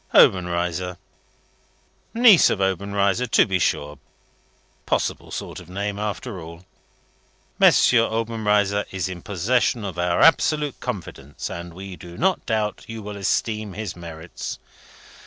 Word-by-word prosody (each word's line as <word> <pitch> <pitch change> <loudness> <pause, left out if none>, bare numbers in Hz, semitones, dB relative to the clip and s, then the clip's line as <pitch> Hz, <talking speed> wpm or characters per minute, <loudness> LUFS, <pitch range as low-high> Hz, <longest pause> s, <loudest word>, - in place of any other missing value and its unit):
Obenreizer. 90 0 +3 1.2
Niece 230 -7 +7
of 100 - -1
Obenreizer. 100 +4 0
To - - +4
be 95 -2 0
sure! 75 -3 -1 0.9
Possible - - -1
sort - - -6
of 90 - -14
name, 100 +2 -3
after 105 -1 -4
all! 85 +2 -11 1.0
'M. - - +9
Obenreizer 110 -3 +2
is 95 -1 -3
in 90 -2 -7
possession 110 +4 0
of 95 -3 -5
our 85 0 +1
absolute 150 -3 +3
confidence, 70 +2 -6
and 85 0 -7
we 95 0 -8
do 85 0 -11
not 190 +2 0
doubt 110 -2 -1
you 115 -1 -7
will 105 0 -6
esteem 105 +1 -1
his 105 -3 -5
merits.' 85 -1 -7
100 Hz, 125 wpm, -23 LUFS, 90-110 Hz, 1.2 s, M